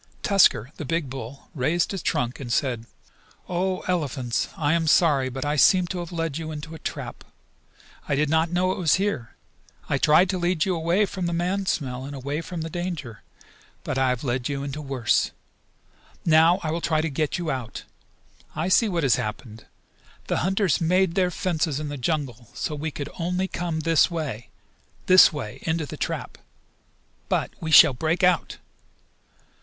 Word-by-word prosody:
Tusker, 175 - +4
the - - -5
big 150 -1 -2
bull, 135 +1 -8
raised 155 +5 0
his 195 -3 -4
trunk 125 -4 -1
and 125 -4 -6
said: 120 -3 -1 0.6
"O, 185 +1 -1
Elephants! 140 -9 -1
I 150 0 +1
am 165 -1 +1
sorry, 145 -5 +4
but 130 +2 -5
I 150 +1 0
seem 185 +5 +5
to 180 - -3
have 175 0 -6
led 165 -3 -3
you 160 -1 -5
into 155 +1 -7
a 160 - -9
trap. - - -6 0.9
I 140 - +2
did 150 +2 +1
not 160 +2 +2
know 180 +2 +1
it - - -4
was 165 -4 +3
here. 185 - -2 0.5
I - - +1
tried 155 +5 +5
to 185 - -2
lead 175 -2 +1
you 185 -2 0
away 170 +5 +2
from 185 -2 -4
the 170 - -2
man 185 +3 -1
smell 130 -6 -2
and 140 +1 -7
away 140 +4 -3
from 170 -1 -6
the 165 - -4
danger, 170 -10 -5 0.6
but 130 - -2
I 130 -1 +3
have 125 0 -2
led 125 -1 -1
you 140 -1 -3
into 140 +2 -5
worse. 135 -5 +1 1.0
Now 165 +2 +5
I 155 - -1
will 170 +1 -2
try 155 -2 +1
to 160 - -1
get 150 +2 -1
you 170 -3 -2
out. 125 -4 -5 0.7
I 160 +4 -1
see 220 +3 +4
what 170 -4 -1
has 130 -5 +3
happened. 110 +1 -6 0.6
The - - -1
hunters 190 0 +1
made 180 +1 +2
their 180 -1 +2
fences 160 -5 -1
in 150 -1 -4
the 145 - -4
jungle 130 -5 -3
so - - -3
we 150 +2 -3
could 145 -1 -6
only 180 +2 -1
come 170 -3 -3
this 165 +1 +3
way 140 - -5 0.6
this 185 0 +8
way 130 -9 -6
into 160 -1 -1
the - - -8
trap. - - -4 0.9
But - - 0
we 160 - -3
shall 150 - +8
break 160 +8 -1
out! 180 -1 +2
160 Hz, 185 wpm, -24 LUFS, 135-175 Hz, 1.0 s, this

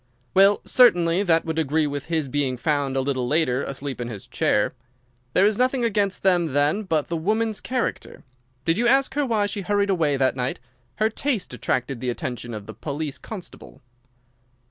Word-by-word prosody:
"Well, 195 +2 +5
certainly 175 -8 +4
that 165 -5 +2
would 160 0 -2
agree 155 +1 +1
with 145 -1 -4
his 160 -3 -1
being 135 -2 -1
found 140 -1 0
a - - +2
little 130 -2 -1
later 140 -3 +1
asleep 135 -2 -5
in 120 - -3
his 110 -5 -8
chair. 105 - +1 0.6
There 190 - +4
is 210 +1 +2
nothing 255 0 +2
against 200 -3 0
them 175 -6 +2
then 145 +8 +2
but 160 -7 -1
the 170 - -3
woman's 215 +6 -1
character. 255 -1 -3 0.4
Did 165 +5 +1
you 240 - +2
ask 270 +2 +4
her 290 -1 0
why 215 -3 +1
she 205 0 -3
hurried 200 +1 +1
away 155 -6 +1
that 130 -1 +2
night? 125 0 -2 0.4
Her 220 +1 +1
haste 245 - 0
attracted 125 +1 -2
the 125 0 -2
attention 120 -1 -4
of 105 -1 -7
the - - -9
police 145 -1 -5
constable." 195 - -10
160 Hz, 185 wpm, -23 LUFS, 135-205 Hz, 0.6 s, Well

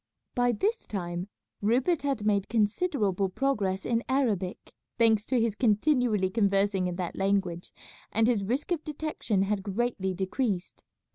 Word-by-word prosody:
By 245 -1 +2
this 420 - -1
time 175 -2 -4 0.3
Rupert 250 - +2
had 275 -7 -1
made 200 -2 +1
considerable 210 - +1
progress 195 -5 -1
in 235 0 0
Arabic, 215 -9 -1 0.2
thanks 225 -2 +3
to 255 - +2
his 225 -2 +1
continually 215 -3 +2
conversing 200 -2 +2
in 180 - -3
that 180 -1 -4
language, 195 -3 -1 0.4
and 225 +1 +3
his 225 -4 +2
risk 255 - -2
of 325 -3 0
detection 300 -10 -1
had 200 0 -1
greatly 195 -2 -1
decreased. 190 0 -2
210 Hz, 140 wpm, -28 LUFS, 195-245 Hz, 0.4 s, thanks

